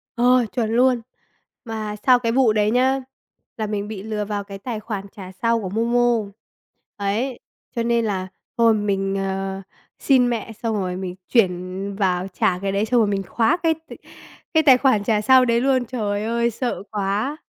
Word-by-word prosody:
Ờ, 250 0 +4
chuẩn 230 -3 0
luôn! 250 +1 +3 0.6
Mà 215 -2 -4
sau 250 -1 +7
cái 230 -2 -1
vụ 245 -3 +3
đấy 210 0 +2
nhá, 260 +3 +2 0.6
là 215 -2 -2
mình 205 -1 -3
bị 210 -3 -7
lừa 215 -1 -3
vào 205 -1 -3
cái 200 0 -9
tài 225 0 -4
khoản 210 -3 -5
trả 190 -3 -9
sau 230 0 +2
của 190 - -4
MoMo. 235 +3 +2 0.8
Đấy, 225 +6 -1 0.4
cho 235 - 0
nên 235 -1 +1
là 190 -3 -2 0.3
thôi, 230 -1 +5
mình, 195 -2 -1
ờ, 195 0 -3 0.4
xin 255 -3 +3
mẹ 225 -1 -3
xong 225 -1 0
rồi 185 -3 -2
mình 185 -1 -5
chuyển 190 -2 0
vào 185 -2 0
trả 180 -1 0
cái 195 +1 -2
đấy, 200 +2 0
xong 240 +1 +2
rồi 220 - +3
mình 200 -1 -1
khóa 225 - +1
cái 325 -1 +4
t 320 +1 -14 0.6
cái 315 -1 +4
tài 265 -4 +7
khoản 255 -6 +2
trả 210 0 +1
sau 255 +4 +6
đấy 235 0 +2
luôn. 260 -2 +2
Trời 210 -4 -2
ơi, 235 +1 0
sợ 240 -2 -3
quá! 210 +8 -1
220 Hz, 190 wpm, -22 LUFS, 200-240 Hz, 0.8 s, sau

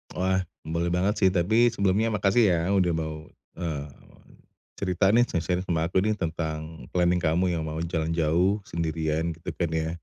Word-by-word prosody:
Wah, 95 0 +1 0.2
boleh 85 +2 -1
banget 95 +4 +1
sih, 95 - +7
tapi 110 +7 +3
sebelumnya 100 +1 +1
makasih 105 0 +3
ya 85 - +2 0.2
udah 90 -3 +3
mau, 80 -1 -4 0.2
eee, 75 -4 -4 0.9
cerita 95 0 +1
nih 120 +1 +6
sharing-sharing 90 +2 -1
sama 85 -3 0
aku 95 +2 +1
nih 110 0 0
tentang 80 -2 -4
planning 90 0 +2
kamu 85 +2 +1
yang 80 -1 -2
mau 80 0 -4
jalan 80 -1 -2
jauh 85 +5 +2
sendirian 80 0 -1
gitu 80 +2 -7
kan 85 -3 -1
ya, 80 0 -1
85 Hz, 170 wpm, -26 LUFS, 80-95 Hz, 0.9 s, sih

